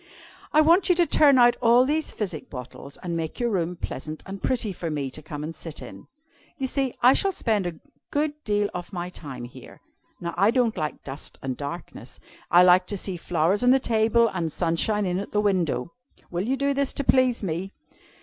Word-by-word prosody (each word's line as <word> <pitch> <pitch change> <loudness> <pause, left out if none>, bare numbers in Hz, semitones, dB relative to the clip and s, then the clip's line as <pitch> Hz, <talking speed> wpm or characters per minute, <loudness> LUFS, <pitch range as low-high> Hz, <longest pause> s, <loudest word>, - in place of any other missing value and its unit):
"'I 305 - +6
want 340 +5 +4
you 360 - +5
to 345 0 +4
turn 285 -4 +5
out 240 -1 +6
all 240 +1 +5
these 305 +3 0
physic 180 -8 -5
bottles, 130 +2 -9
and 175 -2 -3
make 160 -1 -4
your 240 -1 0
room 180 -3 -1
pleasant 155 -2 -6
and 195 0 -7
pretty 230 -6 -1
for 170 -1 -5
me 145 -4 -3
to 155 - -7
come 150 -1 -7
and 160 +2 -5
sit 160 -1 -8
in. - - -11 0.5
You 270 - -2
see, 265 -1 -1
I 250 +2 +8
shall 390 +5 +2
spend 215 - 0
a 165 -3 -6 0.3
good 295 +1 0
deal 205 -1 +1
of 180 +1 -6
my 180 -2 -4
time 135 -8 -8
here! 120 - -12 0.4
Now 170 -1 -4
I 200 +4 +4
don't 235 -2 +2
like 150 -3 -4
dust 140 +1 -9
and 130 -1 -2
darkness. 145 +6 -8 0.3
I 175 +1 +7
like 180 0 +5
to 205 - -3
see 190 0 -3
flowers 175 +3 0
on 250 - +4
the 260 - +6
table, 230 -1 +3
and 170 -4 -2
sunshine 185 +6 0
in 180 0 -1
at 200 - -7
the 210 - +2
window. 175 -9 0 0.4
Will 180 +4 -2
you 265 +2 0
do 280 +1 +1
this 280 -1 0
to 280 - -2
please 255 -4 +3
me?' 180 +2 -3
195 Hz, 210 wpm, -25 LUFS, 165-245 Hz, 0.5 s, I